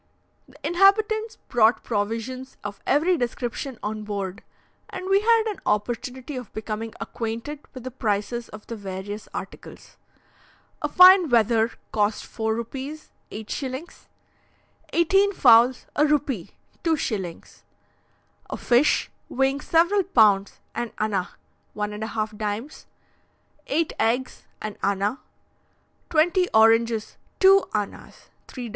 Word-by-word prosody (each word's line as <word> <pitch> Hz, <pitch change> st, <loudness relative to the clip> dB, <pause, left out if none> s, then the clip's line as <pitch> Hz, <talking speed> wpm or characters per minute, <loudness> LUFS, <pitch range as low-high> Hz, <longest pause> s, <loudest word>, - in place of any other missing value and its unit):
The 265 Hz, -, -20 dB
inhabitants 425 Hz, +6 st, +3 dB
brought 230 Hz, -1 st, +3 dB
provisions 230 Hz, +5 st, -3 dB
of 205 Hz, -1 st, -6 dB
every 330 Hz, +6 st, +3 dB
description 245 Hz, 0 st, -3 dB
on 215 Hz, +1 st, -3 dB
board, 200 Hz, -3 st, -4 dB, 0.5 s
and 370 Hz, -, -6 dB
we 390 Hz, +1 st, +4 dB
had 455 Hz, +1 st, +4 dB
an 425 Hz, -3 st, -3 dB
opportunity 245 Hz, +6 st, -2 dB
of 250 Hz, -4 st, -7 dB
becoming 220 Hz, +1 st, -5 dB
acquainted 230 Hz, +6 st, -5 dB, 0.2 s
with 255 Hz, -, -8 dB
the 255 Hz, -, -6 dB
prices 230 Hz, 0 st, -2 dB
of 215 Hz, 0 st, -11 dB
the 230 Hz, -, -6 dB
various 200 Hz, +1 st, -7 dB
articles. -, -, -9 dB, 0.8 s
A -, -, -1 dB
fine 365 Hz, -2 st, +8 dB
wether 230 Hz, -1 st, +3 dB, 0.2 s
cost 210 Hz, 0 st, 0 dB
four 220 Hz, -1 st, -2 dB
rupees 270 Hz, +6 st, -6 dB, 0.2 s
(8s.); 260 Hz, -, -6 dB, 0.8 s
eighteen 390 Hz, +4 st, +3 dB
fowls, 245 Hz, -4 st, +5 dB
a 295 Hz, -, +3 dB
rupee 290 Hz, -, 0 dB, 0.3 s
(2s.); 215 Hz, -, -3 dB, 0.9 s
a -, -, -4 dB
fish, 245 Hz, +5 st, +2 dB, 0.2 s
weighing 270 Hz, +2 st, 0 dB
several 345 Hz, +7 st, +3 dB
pounds, 210 Hz, -, +3 dB
an 240 Hz, -1 st, -4 dB
anna 200 Hz, -4 st, -1 dB, 0.5 s
(1.5d.); 215 Hz, +3 st, -4 dB, 0.8 s
eight 320 Hz, +3 st, 0 dB
eggs, 240 Hz, +4 st, -1 dB, 0.2 s
an 215 Hz, -1 st, -5 dB
anna; 200 Hz, +5 st, 0 dB, 0.9 s
twenty 350 Hz, +3 st, +3 dB
oranges, 225 Hz, 0 st, +3 dB, 0.2 s
two 390 Hz, 0 st, +6 dB
annas 210 Hz, -2 st, -5 dB, 0.2 s
(3d.) 245 Hz, -3 st, -7 dB
240 Hz, 110 wpm, -24 LUFS, 215-300 Hz, 0.9 s, fine